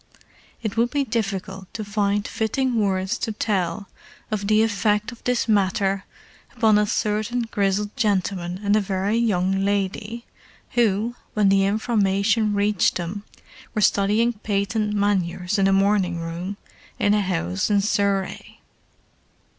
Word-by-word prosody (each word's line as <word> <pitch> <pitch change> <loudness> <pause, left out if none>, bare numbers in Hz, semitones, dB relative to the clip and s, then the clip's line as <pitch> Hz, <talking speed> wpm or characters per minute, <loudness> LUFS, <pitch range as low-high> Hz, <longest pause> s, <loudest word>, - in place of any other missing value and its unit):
It 215 0 -3
would 235 +1 +3
be 285 +1 0
difficult 195 -5 -3
to 215 - -4
find 205 0 0
fitting 250 +4 -1
words 190 +1 -1
to 225 - -2
tell 200 -3 -1 0.4
of 205 -2 -2
the 215 +1 +4
effect 210 0 +1
of 235 - -14
this 250 -1 +1
matter 195 -1 +1 0.5
upon 215 -3 +4
a 210 - +1
certain 215 +3 -1
grizzled 205 -1 -1
gentleman 190 -6 -1
and 205 +1 +3
a 215 - +3
very 195 +2 -1
young 195 -4 +1
lady 205 +4 -2 0.5
who, 225 0 +1 0.2
when 210 -2 +4
the 195 0 +4
information 210 0 +1
reached 205 -2 +2
them 185 +4 -4 0.5
were 215 - +1
studying 210 +4 +3
patent 210 0 -1
manures 190 -1 0
in 195 - +4
a - - +3
morning 195 -2 +2
room 170 +4 -5 0.4
in 205 - +2
a 210 - +3
house 90 - -1
in 205 -1 +3
Surrey. 200 -1 -1
205 Hz, 140 wpm, -23 LUFS, 195-215 Hz, 0.5 s, the